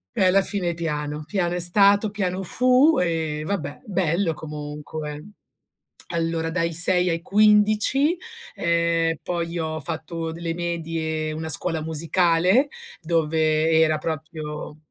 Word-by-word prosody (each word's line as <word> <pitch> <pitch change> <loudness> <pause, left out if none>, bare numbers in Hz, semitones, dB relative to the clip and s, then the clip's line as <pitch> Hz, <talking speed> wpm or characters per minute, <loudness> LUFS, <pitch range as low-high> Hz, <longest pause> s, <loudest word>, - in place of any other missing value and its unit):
E - - +2
alla 190 +2 +4
fine 185 -4 0
piano, 150 -2 -4
piano 175 -1 -1
è 180 - -2
stato, 200 +4 +4
piano 190 -2 -2
fu 255 - +4
e 160 -3 -1
vabbè, 150 -6 -4
bello 180 -3 0
comunque. 150 +2 -7 0.8
Allora 165 -1 -1
dai 170 -1 -1
6 180 +2 +4
ai 165 0 -1
15. 215 - +3 0.4
Ehm, 170 -1 +1
poi 170 -1 -3
ho 155 -1 -3
fatto 160 +2 -5
delle 165 0 -4
medie, 165 -2 -3
una 160 +1 -5
scuola 160 +1 +1
musicale 170 - +2 0.3
dove 160 -1 +1
era 160 -1 +3
proprio 155 -1 -6
165 Hz, 120 wpm, -23 LUFS, 155-185 Hz, 0.8 s, alla